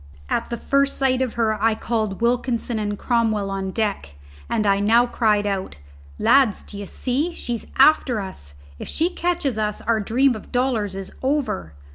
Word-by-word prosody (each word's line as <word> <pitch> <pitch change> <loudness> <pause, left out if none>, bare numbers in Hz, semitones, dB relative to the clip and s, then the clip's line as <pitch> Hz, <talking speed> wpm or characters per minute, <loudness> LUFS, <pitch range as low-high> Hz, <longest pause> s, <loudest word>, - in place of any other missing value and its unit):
At - - -1
the 235 - -3
first 275 +3 +1
sight 260 -1 +2
of 255 -3 -1
her 220 -2 0
I 225 0 +4
had - - -16
called 215 -3 -2
Wilkinson 240 -1 0
and 205 -1 -2
Cromwell 220 -5 0
on 195 -1 -3
deck, 195 - -2 0.3
and 215 - 0
I 200 0 +3
now 230 +4 +4
cried 215 -4 +1
out, 195 -2 -2 0.4
"Lads, 265 -7 +3
d'ye 205 -1 -7
see, 280 - -2
she's 235 -2 -5
after 270 -4 +5
us. 70 - -8 0.2
If - - -6
she 335 +3 0
catches 345 -10 -1
us 210 -1 -1
our 230 -1 +1
dream 245 +5 +2
of 215 - -10
dollars 240 -6 0
is 195 -1 -7
over. 260 - -1
225 Hz, 175 wpm, -22 LUFS, 205-255 Hz, 0.4 s, after